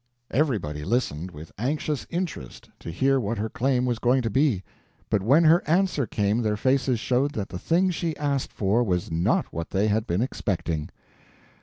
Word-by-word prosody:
Everybody 105 - 0
listened 95 - -1
with 80 -1 -11
anxious 145 +3 -2
interest 170 - -5
to - - -8
hear 135 +11 +2
what 115 0 -2
her 110 +2 -2
claim 125 +1 +1
was 120 -2 -1
going 125 +1 +2
to 115 - -1
be, 130 -6 +2 0.5
but 105 - +2
when 135 - +4
her 165 +2 +6
answer 170 - +2
came 105 +3 0
their 105 -2 0
faces 130 0 +1
showed 130 +6 +1
that 100 -3 -4
the 90 - -6
thing 180 - +2
she 165 -2 -3
asked 140 -2 -1
for 105 +4 +1
was 90 -6 -1
not 80 +2 +1
what 85 0 -4
they 100 +3 +1
had 110 +1 0
been 90 +7 +1
expecting. 85 - -2
120 Hz, 180 wpm, -25 LUFS, 95-140 Hz, 0.5 s, her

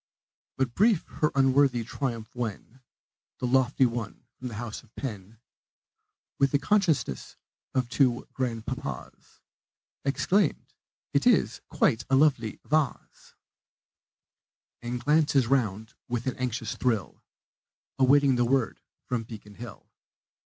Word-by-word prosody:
But 130 -3 0
brief 210 - +3 0.2
her 150 - +3
unworthy 135 -2 +3
triumph 115 -2 -4
when 120 +1 -5 0.6
The - - -3
lofty 130 +1 +3
one 115 0 -4
from 125 - -8
the 115 - -6
house 115 0 -5
of 110 - -26
Penn, 105 -4 -6 1.0
With 140 0 +4
the - - +6
consciousness 145 - 0 0.4
of 130 -2 +1
two 125 -1 +1
grandpapas, 120 -4 -5 0.6
Exclaims, 175 +6 +1 0.4
"It - - +2
is - - +3
quite 110 - +2
a 135 - +4
lovely 135 -6 +2
vahs!" 150 -3 -2 1.5
And 120 +1 -3
glances 145 -1 +3
round 110 -4 0
with 120 -1 -2
an 130 - -1
anxious 125 -2 -3
thrill, 115 -7 -1 0.8
Awaiting 135 0 +5
the 120 - +3
word 130 -2 0 0.3
of 115 -3 -1
Beacon 105 -3 -10
Hill. 115 +1 -10
125 Hz, 115 wpm, -27 LUFS, 115-140 Hz, 1.5 s, the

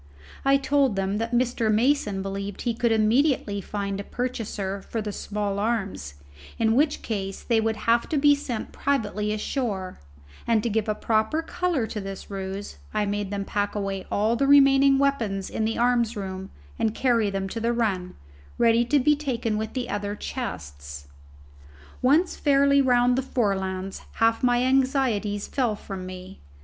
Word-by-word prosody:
I 275 0 +5
told 275 -4 +2
them 195 +1 -1
that 230 +1 -2
Mr. 240 -2 +1
Mason 215 -4 +1
believed 195 0 -5
he 240 - 0
could 235 0 0
immediately 220 -1 +2
find 200 -1 -4
a - - -4
purchaser 210 -5 -4
for 225 - -5
the 210 -1 -3
small 205 -1 -3
arms, 200 - -2 0.4
in 225 -1 +2
which 295 +3 +2
case 195 -3 -4
they 230 -2 +2
would 220 0 0
have 230 +2 +1
to 310 - 0
be 290 +1 +6
sent 260 -6 -4
privately 210 -6 -1
ashore; 210 -4 -3 0.5
and 225 -2 +3
to 235 - -1
give 215 0 0
a 210 - +1
proper 220 +10 0
colour 335 -7 -1
to 215 -1 -5
this 195 +1 -8
ruse 195 +1 -5
I 210 -1 0
made 205 -1 -2
them 200 -1 -3
pack 205 +1 -2
away 195 -2 -3
all 215 +3 +2
the 275 +3 +1
remaining 275 -1 +6
weapons 230 -9 0
in 220 - -1
the 225 - -1
arms 240 -2 +2
room 190 -1 -5 0.3
and 220 0 0
carry 235 -5 +2
them 195 -1 -2
to 230 - -4
the 230 +1 +1
run, 200 -7 -1 0.4
ready 235 0 +4
to 290 +5 +3
be 295 +2 +4
taken 245 -7 -2
with 220 0 -3
the 255 -2 -3
other 205 0 -3
chests. 70 - -6 0.9
Once 300 +8 +3
fairly 280 -1 +4
round 245 -1 +3
the - - +2
Forelands 195 -6 -2
half 225 0 +2
my 245 -1 +3
anxieties 255 -6 +1
fell 245 -6 0
from 190 -3 -7
me. 185 +1 -10
220 Hz, 170 wpm, -25 LUFS, 200-255 Hz, 0.9 s, be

